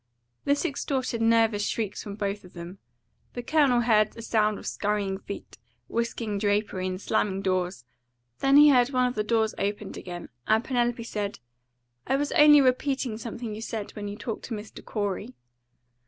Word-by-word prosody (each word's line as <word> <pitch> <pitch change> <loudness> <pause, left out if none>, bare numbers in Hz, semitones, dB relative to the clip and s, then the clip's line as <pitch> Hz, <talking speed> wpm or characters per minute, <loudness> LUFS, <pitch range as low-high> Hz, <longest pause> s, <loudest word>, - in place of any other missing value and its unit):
This 285 0 +2
extorted 260 -4 -2
nervous 225 -2 +3
shrieks 215 -3 -2
from 200 -1 -7
both 200 0 -3
of 180 - -15
them. 175 +2 -9 0.5
The 245 - -5
Colonel 275 -4 +3
heard 215 -3 +3
a 230 - -7
sound 215 -2 +1
of - - -11
scurrying 200 -2 -1
feet, 200 - -9 0.3
whisking 230 -3 -2
drapery, 205 -2 0
and 185 0 -3
slamming 195 -1 0
doors. 180 -9 -1 0.5
Then 275 +1 +5
he 295 0 +9
heard 250 -2 +5
one 255 -2 +2
of 250 - 0
the 215 - -1
doors 220 0 +1
opened 205 0 -3
again, 175 -1 -7 0.2
and 220 +1 +3
Penelope 240 -2 0
said, 210 -3 -3 0.7
"I - - +2
was 290 +1 -1
only 295 -1 +7
repeating 255 -3 +1
something 230 -1 -5
you 215 - -7
said 220 -2 -4
when 205 -1 -6
you 205 +1 -6
talked 225 -1 -5
to 230 - -4
Mr. 210 +1 -9
Corey." 205 +3 -3
220 Hz, 170 wpm, -27 LUFS, 205-245 Hz, 0.7 s, he